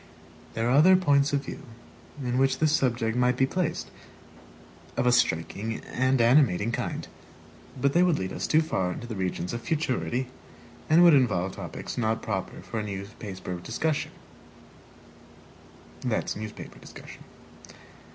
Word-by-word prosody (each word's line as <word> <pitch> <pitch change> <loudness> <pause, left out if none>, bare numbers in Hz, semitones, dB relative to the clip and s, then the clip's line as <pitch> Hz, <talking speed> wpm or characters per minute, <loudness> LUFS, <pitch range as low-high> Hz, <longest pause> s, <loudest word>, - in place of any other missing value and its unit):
There 115 +1 0
are - - +2
other 180 +6 +7
points 145 -6 +3
of 140 -1 -1
view - - -7 0.6
in 125 0 0
which 135 -1 +2
this 155 +1 +2
subject 120 -6 +1
might 125 0 +2
be 130 - +4
placed, 165 +3 -2 1.1
of - - +1
a 125 - +5
striking 110 0 0
and 130 +1 +1
animating 115 -4 +4
kind. - - -3 0.7
But 140 +2 +2
they 175 - +4
would 180 -3 +3
lead 95 0 -4
us - - -3
too 155 +1 +4
far 95 - -1
into 120 - -7
the 115 -2 -6
regions 90 -1 -3
of 120 - -4
futurity, 130 -4 -1 0.6
and 165 +3 +6
would 170 -2 +8
involve 105 -9 +2
topics - - -6
not 110 -1 0
proper 95 -4 -4
for 115 - -4
a - - -2
newspaper 100 -2 -6
discussion. 155 - -2
125 Hz, 135 wpm, -27 LUFS, 110-145 Hz, 1.1 s, would